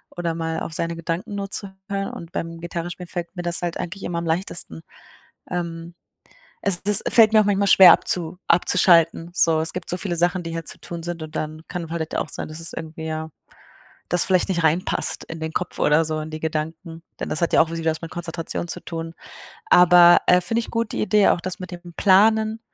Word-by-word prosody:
oder 170 -2 -2
mal 165 0 -3
auf 160 - -5
seine 165 +1 -1
Gedanken 165 +4 -4
nur 200 -1 -5
zu 200 -2 -1 0.2
hören 195 -1 -3
und 170 0 -9
beim 165 0 -5
Gitarre 170 0 -5
spielen 180 0 -8
fällt 175 +1 -6
mir 175 - -5
das 175 0 -1
halt 175 -1 -3
eigentlich 180 +3 -6
immer 175 - -3
am 170 - -5
leichtesten. 165 - -2 0.7
Ähm, 170 -1 -5 0.7
es 190 -3 -1
es 205 -1 +6
fällt 225 -2 +5
mir 215 - +6
auch 215 - +3
manchmal 200 0 +1
schwer 185 -2 +9
abzu 175 0 0
abzuschalten. 170 -1 +3
So, 160 -3 +3
es 160 - 0
gibt 180 -2 -6
so 180 - -1
viele 180 -3 -3
Sachen, 175 +2 +1
die 165 - -6
hier 165 0 -5
zu - - -5
tun 170 -1 -7
sind 170 -1 -5
und 155 0 -9
dann 155 +1 -4
kann 170 -3 -6
halt 160 -1 -4
auch - - -2
sein, - - -5
dass 155 +1 -8
es 165 - -4
irgendwie 160 0 -7
ja, 160 0 -4 0.8
das 175 - +4
vielleicht 185 0 +2
nicht 170 -3 -1
reinpasst 160 +3 0
in 160 0 -9
den 160 0 -4
Kopf 180 +1 -4
oder 150 +2 +3
so 155 0 -3
in 155 - -6
die 155 0 -7
Gedanken, 160 +2 -5 0.2
denn - - -3
das 155 - -2
hat 170 - +1
ja - - +5
auch 160 - -3
wieder 165 -1 -1
was 155 - -5
mit 165 - -7
Konzentration 170 0 -4
zu - - -4
tun. 165 -1 -6 0.6
Aber, 175 -1 +7
äh, 180 - +5
finde 225 +6 -1
ich - - -7
gut, 230 -1 -2
die - - -2
Idee, 210 0 +3
auch - - +2
das 185 +1 -3
mit 185 - -7
dem 175 0 -10
Planen, 220 +3 +3
170 Hz, 225 wpm, -22 LUFS, 165-180 Hz, 0.8 s, schwer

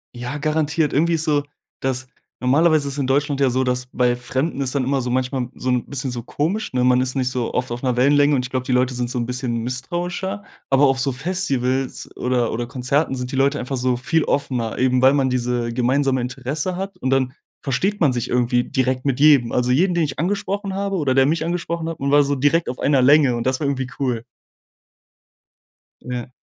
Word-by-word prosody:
Ja, 125 +4 -5
garantiert. 150 0 0
Irgendwie 170 +4 +2
ist 160 -1 0
so, 150 -2 +2 0.4
dass 130 -1 -2 0.3
normalerweise 145 +3 +3
ist 140 +1 -4
in 135 - 0
Deutschland 140 +1 +1
ja 135 - +4
so, 130 +1 +1
dass 125 0 -1
bei 125 -1 +2
Fremden 130 +4 -2
ist 135 0 -2
dann 140 - +1
immer 135 +1 0
so 125 - -3
manchmal 130 0 -1
so 130 - -3
'n 125 -1 0
bisschen 135 -2 -3
so 120 -1 -4
komisch, 165 - -2
ne? 125 -1 +1
Man 125 0 +4
ist 130 +1 -2
nicht 130 -2 0
so 125 -2 -2
oft 125 -1 -1
auf 120 +1 -4
'ner 125 -2 -1
Wellenlänge 145 +3 +4
und 125 -2 0
ich 125 - -9
glaube, 130 -1 -1
die - - -2
Leute 125 +1 +2
sind 120 -1 -2
so 125 - -3
'n 120 - -1
bisschen 125 -2 -2
misstrauischer, 175 - -3 0.3
aber 135 +1 +5
auf 135 -1 +2
so 135 +1 +1
Festivals 135 -4 -2
oder 125 -2 0
oder 120 +1 -3
Konzerten 135 +3 0
sind 125 0 -5
die - - -3
Leute 140 +2 +2
einfach 130 +2 -3
so 125 0 0
viel 160 +5 +1
offener, 125 -5 -1
eben 130 0 +2
weil 130 +1 +6
man 135 -2 +1
diese 120 -1 -1
gemeinsame 130 +2 +1
Interesse 135 +8 -3
hat 195 +2 -5
und 130 - -2
dann 130 -1 +1 0.3
versteht 185 +10 -1
man 150 -5 +4
sich 120 -2 -3
irgendwie 120 0 +2
direkt 130 -1 -1
mit 135 -2 0
jedem. 140 -5 +5
Also 125 0 +1
jeden, 175 +7 +2
den 170 - +2
ich 140 -3 -3
angesprochen 200 +2 -2
habe 195 0 -1
oder 140 -6 +1
der 135 0 +5
mich 160 +3 +1
angesprochen 170 -1 -3
hat, 165 - -6
man 140 0 -1
war 145 0 +6
so 140 0 0
direkt 145 +5 +2
auf 125 - -5
einer 140 -2 +3
Länge 140 -1 +5
und 120 +1 -2
das 130 0 0
war 150 - -2
irgendwie 135 -2 -1
cool. 125 -4 -1 1.8
Ja. 125 0 -6
130 Hz, 220 wpm, -21 LUFS, 125-150 Hz, 1.8 s, weil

